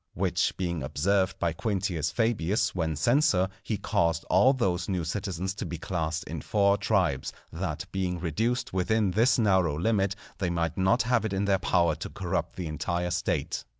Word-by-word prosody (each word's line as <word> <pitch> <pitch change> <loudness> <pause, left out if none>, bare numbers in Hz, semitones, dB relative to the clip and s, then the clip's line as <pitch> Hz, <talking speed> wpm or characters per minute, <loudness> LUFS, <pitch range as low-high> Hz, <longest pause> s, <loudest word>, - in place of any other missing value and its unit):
Which - - 0
being 85 -4 -2
observed 95 +8 0
by 85 -1 0
Quintius 90 -6 -1
Fabius 105 +1 +1
when 80 -3 -1
censor, 120 - +3
he 110 - -2
caused 85 -2 0
all 100 +9 +6
those 95 -9 -1
new 90 -3 -1
citizens 95 +2 -3
to 105 - -5
be 85 - -5
classed 85 -3 -2
in - - -6
four 100 -1 +3
Tribes, 95 -9 0 0.2
that - - -3
being 90 -2 -2
reduced 110 - -1
within 100 +2 +1
this 115 +5 +3
narrow 95 -9 +2
limit 100 +1 +1 0.2
they 95 - 0
might 85 -2 -1
not 95 +6 +3
have 120 -2 +2
it 110 -3 -2
in 95 +1 0
their 100 -1 +2
power 85 -3 +2
to - - -6
corrupt - - -3
the 90 - -4
entire 85 +3 -2
State. 85 -3 -1
95 Hz, 175 wpm, -28 LUFS, 85-105 Hz, 0.2 s, all